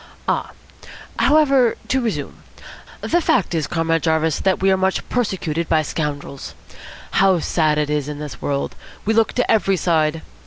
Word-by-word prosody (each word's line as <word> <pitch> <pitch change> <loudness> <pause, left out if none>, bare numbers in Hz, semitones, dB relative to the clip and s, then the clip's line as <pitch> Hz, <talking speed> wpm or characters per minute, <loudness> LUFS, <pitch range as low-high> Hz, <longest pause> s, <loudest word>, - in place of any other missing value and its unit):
"Ah! - - 0 0.7
However, 275 -5 +4
to 265 0 +2
resume. 230 -3 -3 0.6
The 345 - +1
fact 195 - +1
is, 160 -4 -1
Comrade 165 -1 0
Jarvis, 160 -1 +1 0.2
we 195 0 +3
are - - +4
much 190 0 -1
persecuted 175 -9 -2
by 155 -1 +3
scoundrels. 145 -3 -5 0.6
How 195 -2 +4
sad 155 -2 +1
it 150 -1 0
is 150 -1 -1
in 150 - -5
this 145 -7 -8
world! 140 -1 -2 0.3
We 220 - +2
look 225 0 +2
to 250 - +1
every 195 -3 +2
side. 160 -2 +1
165 Hz, 155 wpm, -20 LUFS, 150-205 Hz, 0.7 s, However